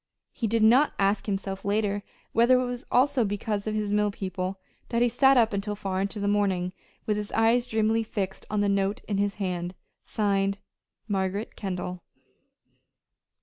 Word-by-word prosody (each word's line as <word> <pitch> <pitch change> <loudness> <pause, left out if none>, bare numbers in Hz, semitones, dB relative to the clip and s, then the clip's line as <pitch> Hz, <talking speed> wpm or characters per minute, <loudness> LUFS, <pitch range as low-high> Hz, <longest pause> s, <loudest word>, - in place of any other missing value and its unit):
He 230 - -2
did 225 +1 +2
not 250 +7 +5
ask 200 +2 +1
himself 195 -1 -3
later 205 0 0 0.3
whether 240 +3 +5
it 255 - 0
was 245 0 -5
also 255 0 +3
because 205 0 -2
of 215 - -1
his 210 -1 -1
mill 210 0 +3
people 190 -1 -4 0.3
that 235 0 +2
he - - +4
sat 265 +3 +4
up 225 -3 +4
until 205 +1 -2
far 190 -2 -2
into 200 +2 -2
the 200 - -1
morning, 190 -3 +1 0.3
with 210 -1 0
his 210 -1 -4
eyes 230 +2 +3
dreamily 220 +1 +2
fixed 195 -3 -4
on 210 -1 0
the 205 - +2
note 200 0 0
in 200 -2 -1
his 200 0 0
hand 180 -2 -3 0.3
signed, 200 -1 0 0.5
"Margaret 195 +1 -2
Kendall." 180 -2 -4
205 Hz, 170 wpm, -27 LUFS, 195-225 Hz, 0.5 s, not